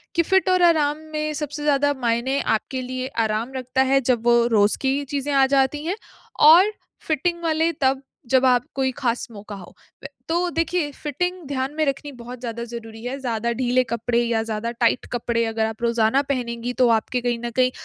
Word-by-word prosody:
कि 335 Hz, -, +4 dB
फिट 380 Hz, +2 st, +2 dB
और 365 Hz, -1 st, +3 dB
आराम 305 Hz, -3 st, +3 dB, 0.2 s
में 305 Hz, 0 st, -2 dB
सबसे 295 Hz, 0 st, -5 dB
ज़्यादा 285 Hz, -1 st, +2 dB
मायने 240 Hz, +3 st, 0 dB
आपके 255 Hz, +4 st, -1 dB
लिए 255 Hz, +1 st, -4 dB, 0.2 s
आराम 220 Hz, +4 st, -2 dB
रखता 260 Hz, +1 st, -1 dB
है 275 Hz, -, +4 dB
जब 240 Hz, -2 st, 0 dB
वो 235 Hz, 0 st, +5 dB
रोज़ 205 Hz, +1 st, +3 dB
की 275 Hz, +1 st, 0 dB
चीज़ें 285 Hz, +1 st, -3 dB
आ 270 Hz, -1 st, +5 dB
जाती 275 Hz, +3 st, +1 dB
हैं, 365 Hz, +4 st, -1 dB, 0.4 s
और 350 Hz, +7 st, +7 dB, 0.4 s
फिटिंग 340 Hz, +3 st, 0 dB
वाले 325 Hz, +1 st, +1 dB
तब 265 Hz, +1 st, +2 dB, 0.3 s
जब 260 Hz, 0 st, +4 dB
आप 250 Hz, -1 st, +4 dB
कोई 265 Hz, -1 st, +1 dB
खास 235 Hz, -2 st, -1 dB
मौका 205 Hz, -1 st, -9 dB
हो। 185 Hz, -3 st, -12 dB, 0.6 s
तो 350 Hz, +2 st, +1 dB
देखिए 330 Hz, -2 st, -1 dB
फिटिंग 315 Hz, +6 st, -3 dB
ध्यान 270 Hz, 0 st, -2 dB
में 310 Hz, -1 st, +1 dB
रखनी 285 Hz, +1 st, -3 dB
बहुत 245 Hz, 0 st, -9 dB
ज़्यादा 235 Hz, -1 st, -5 dB
ज़रूरी 225 Hz, -1 st, -9 dB
है। 255 Hz, +3 st, -4 dB
ज़्यादा 235 Hz, -2 st, -2 dB
ढीले 255 Hz, +1 st, +1 dB
कपड़े 235 Hz, 0 st, -1 dB
या 230 Hz, -1 st, 0 dB
ज़्यादा 225 Hz, +1 st, -3 dB
टाइट 235 Hz, +1 st, +1 dB
कपड़े 230 Hz, -1 st, 0 dB
अगर 225 Hz, 0 st, -1 dB
आप 220 Hz, +1 st, -5 dB
रोज़ाना 235 Hz, +3 st, +2 dB
पहनेंगी 240 Hz, -2 st, -2 dB
तो 245 Hz, -, +6 dB
आपके 230 Hz, +2 st, +1 dB
कहीं 240 Hz, -1 st, -1 dB
न -, -, -2 dB
कहीं 255 Hz, 0 st, +4 dB
255 Hz, 190 wpm, -22 LUFS, 235-290 Hz, 0.6 s, और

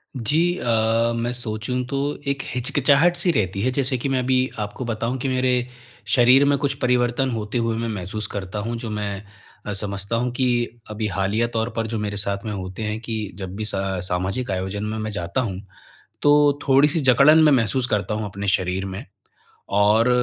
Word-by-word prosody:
जी। 160 Hz, +9 st, +1 dB
अ, 115 Hz, -1 st, +1 dB
मैं 120 Hz, +1 st, -1 dB
सोचूँ 120 Hz, +1 st, -2 dB
तो 140 Hz, -, -3 dB, 0.3 s
एक 140 Hz, -1 st, 0 dB
हिचकिचाहट 140 Hz, +7 st, +3 dB
सी 175 Hz, 0 st, +2 dB
रहती 100 Hz, -, -1 dB
है 125 Hz, +4 st, +1 dB
जैसे 130 Hz, 0 st, 0 dB
कि 135 Hz, +3 st, -3 dB
मैं 130 Hz, -, +1 dB
अभी 130 Hz, +1 st, +1 dB
आपको 105 Hz, +4 st, -4 dB
बताऊँ 115 Hz, +2 st, -2 dB
कि 135 Hz, -, -2 dB
मेरे 125 Hz, -1 st, +1 dB, 0.4 s
शरीर 130 Hz, +2 st, +5 dB
में 140 Hz, 0 st, +3 dB
कुछ 140 Hz, 0 st, 0 dB
परिवर्तन 125 Hz, +1 st, +2 dB
होते 110 Hz, +1 st, -3 dB
हुए 115 Hz, -1 st, 0 dB
मैं 115 Hz, 0 st, -2 dB
महसूस 105 Hz, +1 st, -4 dB
करता 100 Hz, +1 st, -5 dB
हूँ 115 Hz, +3 st, -3 dB
जो 115 Hz, -1 st, -6 dB
मैं 105 Hz, -1 st, -3 dB, 0.5 s
अ, 105 Hz, -, -3 dB
समझता 100 Hz, +2 st, -2 dB
हूँ 125 Hz, +1 st, 0 dB
कि 120 Hz, -1 st, 0 dB
अभी 105 Hz, 0 st, -2 dB
हालिया 100 Hz, +4 st, 0 dB
तौर 115 Hz, +1 st, 0 dB
पर 115 Hz, -1 st, -1 dB
जो 110 Hz, 0 st, -3 dB
मेरे 105 Hz, -1 st, -3 dB
साथ 100 Hz, +1 st, -3 dB
में 105 Hz, -, -3 dB
होते 95 Hz, +2 st, -5 dB
हैं 105 Hz, +1 st, -2 dB
कि 110 Hz, -3 st, -4 dB
जब 95 Hz, -1 st, -6 dB
भी 110 Hz, +1 st, -4 dB
सा 95 Hz, -2 st, -2 dB
सामाजिक 95 Hz, +6 st, -2 dB
आयोजन 95 Hz, +2 st, -3 dB
में 110 Hz, +1 st, -3 dB
मैं 110 Hz, 0 st, -3 dB
जाता 100 Hz, +4 st, -2 dB
हूँ। 95 Hz, -6 st, -3 dB, 0.6 s
तो 145 Hz, -1 st, +4 dB
थोड़ी-सी 145 Hz, +4 st, +4 dB
जकड़न 140 Hz, +4 st, +6 dB
मैं 150 Hz, -, +6 dB
महसूस 125 Hz, 0 st, +2 dB
करता 105 Hz, 0 st, 0 dB
हूँ 110 Hz, -, -3 dB
अपने 100 Hz, 0 st, -5 dB
शरीर 95 Hz, 0 st, 0 dB
में 95 Hz, +6 st, -6 dB, 0.7 s
और 105 Hz, +4 st, +4 dB
115 Hz, 195 wpm, -22 LUFS, 105-130 Hz, 0.7 s, जकड़न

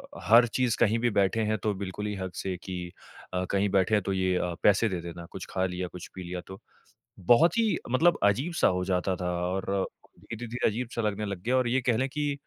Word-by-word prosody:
अ, -, -, -9 dB
हर 120 Hz, +2 st, +8 dB
चीज़ 125 Hz, 0 st, 0 dB
कहीं 115 Hz, 0 st, +3 dB
भी 120 Hz, +1 st, +2 dB
बैठे 100 Hz, +2 st, +2 dB
हैं 110 Hz, -, +1 dB
तो 105 Hz, -1 st, +1 dB
बिल्कुल 100 Hz, +1 st, -5 dB
ही 105 Hz, -, -3 dB
हक़ 95 Hz, -1 st, -6 dB
से 95 Hz, -1 st, -3 dB
कि 90 Hz, -2 st, -5 dB, 0.4 s
अ, 90 Hz, 0 st, 0 dB
कहीं 100 Hz, +1 st, +2 dB
बैठे 95 Hz, +2 st, +2 dB
हैं 105 Hz, -, +2 dB
तो 95 Hz, -, -1 dB
ये 95 Hz, -1 st, +1 dB
अ, 90 Hz, -1 st, -1 dB
पैसे 105 Hz, +2 st, +4 dB
दे 90 Hz, -, -3 dB
देना, 85 Hz, 0 st, -8 dB
कुछ 95 Hz, -, -7 dB
खा 95 Hz, 0 st, 0 dB
लिया, 90 Hz, 0 st, -3 dB
कुछ 90 Hz, 0 st, -9 dB
पी 95 Hz, -, -6 dB
लिया 90 Hz, 0 st, -5 dB
तो। 95 Hz, 0 st, -9 dB, 0.6 s
बहुत 120 Hz, -, +4 dB
ही 225 Hz, -2 st, +2 dB
मतलब 165 Hz, +7 st, +4 dB
अजीब-सा 130 Hz, -, +2 dB
हो 90 Hz, -, -1 dB
जाता 95 Hz, 0 st, 0 dB
था 90 Hz, 0 st, -2 dB, 0.2 s
और 95 Hz, +1 st, -1 dB, 0.3 s
धीरे-धीरे 115 Hz, +1 st, -2 dB
अजीब-सा 115 Hz, +1 st, -3 dB
लगने 105 Hz, 0 st, -1 dB
लग 100 Hz, -3 st, -5 dB
गया, 125 Hz, +4 st, +1 dB
और 125 Hz, -2 st, +2 dB
ये 130 Hz, +2 st, +2 dB
कह 120 Hz, -2 st, +1 dB
लें 130 Hz, +3 st, 0 dB
कि 145 Hz, +1 st, -1 dB
100 Hz, 230 wpm, -28 LUFS, 95-120 Hz, 0.6 s, हर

